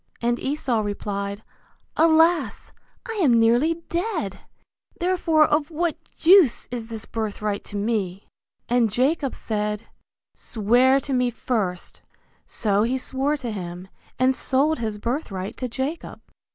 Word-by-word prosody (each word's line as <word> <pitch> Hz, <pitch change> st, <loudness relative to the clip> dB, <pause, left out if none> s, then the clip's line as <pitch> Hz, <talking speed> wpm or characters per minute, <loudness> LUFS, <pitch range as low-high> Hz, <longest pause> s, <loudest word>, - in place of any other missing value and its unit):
And 240 Hz, 0 st, 0 dB
Esau 265 Hz, -4 st, -1 dB
replied, 200 Hz, 0 st, -4 dB, 0.5 s
Alas! 325 Hz, +1 st, +3 dB, 0.4 s
I 450 Hz, -2 st, -4 dB
am 245 Hz, -8 st, +5 dB
nearly 275 Hz, +9 st, +2 dB
dead, 340 Hz, -, -2 dB, 0.6 s
therefore 340 Hz, -4 st, +3 dB
of 300 Hz, 0 st, +1 dB
what 335 Hz, 0 st, -1 dB, 0.2 s
use 350 Hz, -, +5 dB
is 235 Hz, -2 st, -5 dB
this 225 Hz, -2 st, -7 dB
birthright 210 Hz, -2 st, -3 dB
to -, -, -8 dB
me? 200 Hz, -3 st, -2 dB, 0.4 s
And 240 Hz, -2 st, +3 dB
Jacob 270 Hz, +5 st, 0 dB
said, 210 Hz, 0 st, -3 dB, 0.5 s
Swear 245 Hz, +5 st, +2 dB
to 275 Hz, -, -4 dB
me 250 Hz, -1 st, +2 dB
first; 215 Hz, -6 st, -3 dB, 0.5 s
so 205 Hz, -2 st, 0 dB
he 240 Hz, +4 st, +1 dB
swore 270 Hz, +3 st, -1 dB
to 245 Hz, -5 st, -5 dB
him, 180 Hz, -2 st, -7 dB, 0.3 s
and 255 Hz, +1 st, +3 dB
sold 275 Hz, +4 st, +1 dB
his 220 Hz, -2 st, -3 dB
birthright 210 Hz, -5 st, -4 dB
to 255 Hz, -, -3 dB
Jacob. 265 Hz, +7 st, -4 dB
245 Hz, 125 wpm, -23 LUFS, 210-300 Hz, 0.6 s, am